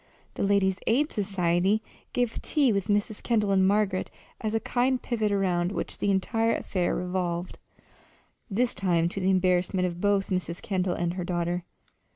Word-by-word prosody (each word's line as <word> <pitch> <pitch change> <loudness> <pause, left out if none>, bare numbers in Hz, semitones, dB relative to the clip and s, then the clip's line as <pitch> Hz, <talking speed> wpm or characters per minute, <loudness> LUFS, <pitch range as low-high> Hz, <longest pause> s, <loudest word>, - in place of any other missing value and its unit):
The - - -5
Ladies' 195 -1 +2
Aid 285 +7 +2
Society 190 0 +1 0.3
gave 245 -2 0
a - - -3
tea 280 -7 +2
with 200 -1 -1
Mrs. 205 0 0
Kendall 215 -4 +1
and 190 -1 +4
Margaret 200 -2 +1 0.3
as 215 - -2
a - - +3
kind 250 +3 +1
of 250 - -6
pivot 220 -4 0
around 180 -3 +1
which - - -4
the 205 - 0
entire 225 +4 +1
affair 180 -3 -1
revolved 180 -1 -3 0.9
this 235 +4 +1
time 175 -3 +1
to 195 - -5
the 185 - +2
embarrassment 185 0 +2
of 175 -1 -4
both 200 -1 +1
Mrs. 180 -2 -2
Kendall 185 -2 -1
and 170 0 -1
her 180 0 -3
daughter. 175 0 -2
190 Hz, 175 wpm, -27 LUFS, 180-210 Hz, 0.9 s, and